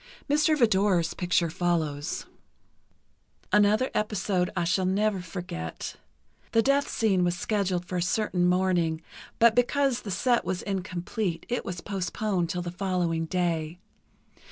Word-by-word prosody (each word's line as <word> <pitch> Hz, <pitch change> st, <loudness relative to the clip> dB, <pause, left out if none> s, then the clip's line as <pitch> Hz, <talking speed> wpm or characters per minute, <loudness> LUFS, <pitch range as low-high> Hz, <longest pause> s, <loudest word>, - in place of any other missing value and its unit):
Mr. 305 Hz, +1 st, +3 dB
Vidor's 195 Hz, -, +3 dB
picture 175 Hz, -2 st, +1 dB
follows: 160 Hz, -4 st, -1 dB, 1.3 s
Another 210 Hz, +5 st, +4 dB
episode 200 Hz, -4 st, 0 dB
I 175 Hz, -, +2 dB
shall 185 Hz, +2 st, +1 dB
never 200 Hz, 0 st, +1 dB
forget: 170 Hz, -, -6 dB, 0.6 s
The 225 Hz, -, +4 dB
death 275 Hz, +2 st, +2 dB
scene 195 Hz, -5 st, +2 dB
was 175 Hz, 0 st, 0 dB
scheduled 185 Hz, -3 st, -1 dB
for 180 Hz, 0 st, -3 dB
a -, -, 0 dB
certain 180 Hz, -1 st, +1 dB
morning, 175 Hz, -3 st, +1 dB, 0.3 s
but 230 Hz, -1 st, +6 dB
because 250 Hz, +2 st, +2 dB
the 205 Hz, -, -7 dB
set 240 Hz, +5 st, +2 dB
was 185 Hz, -1 st, -3 dB
incomplete, 185 Hz, -1 st, -3 dB
it 245 Hz, -, -1 dB
was 180 Hz, -3 st, -5 dB
postponed 190 Hz, -2 st, -2 dB
till 175 Hz, +1 st, -2 dB
the 175 Hz, -, -4 dB
following 175 Hz, -3 st, -1 dB
day. 170 Hz, -2 st, -1 dB
185 Hz, 130 wpm, -27 LUFS, 175-215 Hz, 1.3 s, but